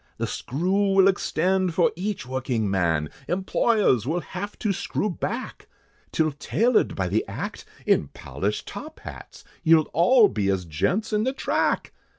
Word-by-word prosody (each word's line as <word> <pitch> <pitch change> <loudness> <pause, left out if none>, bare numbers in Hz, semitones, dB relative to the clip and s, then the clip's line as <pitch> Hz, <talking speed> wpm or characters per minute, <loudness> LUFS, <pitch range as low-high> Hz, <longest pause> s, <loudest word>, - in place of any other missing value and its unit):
The - - -1
screw 190 +9 0
will 195 0 +6
extend 185 -1 +1
for 175 - +3
each 195 -2 -3
working 125 -4 -1
man, 80 -6 0 0.2
Employers 190 - +2
will 170 +4 0
have 200 +4 -6
to 210 -3 0
screw 195 +1 -2
back, 235 +8 -5 0.4
Till 155 -1 +1
tailored 230 - +1
by - - -1
the - - +1
act, - - -6 0.2
in - - +3
polished - - -4
top 310 +1 -9
hats, - - -10 0.2
You'll 160 -1 +4
all 210 - +6
be 100 - -1
as 95 -2 0
gents 185 - -1
in 210 0 +2
the 260 +3 0
track! 270 - 0
180 Hz, 155 wpm, -25 LUFS, 130-205 Hz, 0.4 s, will